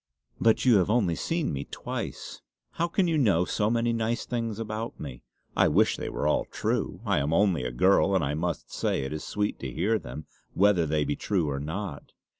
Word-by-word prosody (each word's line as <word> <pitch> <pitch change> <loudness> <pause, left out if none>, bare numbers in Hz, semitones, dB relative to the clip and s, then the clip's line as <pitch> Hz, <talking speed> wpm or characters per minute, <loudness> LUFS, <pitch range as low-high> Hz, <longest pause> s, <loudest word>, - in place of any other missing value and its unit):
"But 115 +2 +3
you 120 -4 +6
have 95 0 +2
only 105 -7 +2
seen 165 - -1
me 70 0 -3
twice. - - -6 0.3
How 170 - -1
can 180 +2 +1
you 160 -2 +2
know 100 - +3
so 105 +3 0
many 115 0 +1
nice 115 +1 -1
things 115 -3 -3
about 110 +1 -5
me. 65 -5 -7 0.3
I - - +5
wish - - +3
they - - -4
were - - -3
all 75 - +2
true! - - -2
I - - +2
am 70 +2 -1
only 90 -4 +3
a 60 - -2
girl; 95 +9 +3
and 95 - +2
I 70 +1 -1
must 85 +2 -3
say - - 0
it 65 - -4
is 75 - -5
sweet 105 0 -2
to 65 - -5
hear 105 - +1
them, 70 +2 -8 0.3
whether 95 -4 +4
they 75 0 +1
be 75 - -1
true 90 -7 0
or 70 - -2
not. 80 +1 -5
100 Hz, 215 wpm, -27 LUFS, 75-115 Hz, 0.3 s, you